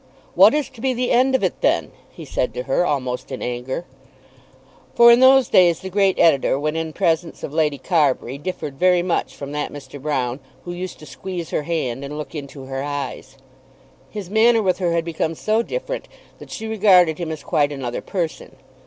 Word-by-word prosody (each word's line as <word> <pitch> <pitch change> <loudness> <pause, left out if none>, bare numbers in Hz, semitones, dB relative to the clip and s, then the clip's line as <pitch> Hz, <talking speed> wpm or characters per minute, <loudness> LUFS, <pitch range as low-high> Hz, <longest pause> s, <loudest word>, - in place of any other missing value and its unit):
"What - - +6
is 300 -2 0
to 260 -4 -14
be 260 0 0
the 245 +1 -1
end 260 +2 +3
of - - 0
it - - -1
then?" - - +1 0.2
he - - -11
said - - -2
to - - -3
her, 180 - +1
almost 130 -7 -2
in 130 - -5
anger. 125 +6 -4 1.1
For 235 0 +8
in 235 - +6
those 260 -1 +6
days 175 -3 +4
the 190 - -7
great 195 -1 +2
editor, 140 -5 +3
when 150 +2 -2
in 160 -1 -3
presence 165 -1 -1
of 145 - -5
Lady 155 -3 +1
Carbury, 140 -3 0
differed 150 -4 -6
very 180 -1 +4
much 175 -2 -1
from 140 0 -7
that 150 0 -3
Mr. 140 -1 -10
Broune 130 -3 -2 0.3
who 175 - -5
used 180 +1 -6
to 150 - -13
squeeze 175 +3 -7
her - - 0
hand 135 -6 -2
and 145 +2 -6
look 150 - -7
into 140 -2 -8
her 135 0 -4
eyes. 140 -2 -5 0.7
His 205 -4 -7
manner 220 +3 +4
with 185 -1 +1
her 175 -3 0
had 165 -1 0
become 165 -1 -2
so 215 +7 +1
different - - -5 0.3
that - - -12
she 225 - -6
regarded 190 -7 +4
him 170 -2 -3
as 155 - -6
quite 145 0 +1
another 130 -4 -4
person. 170 -5 -4
165 Hz, 200 wpm, -21 LUFS, 145-195 Hz, 1.1 s, For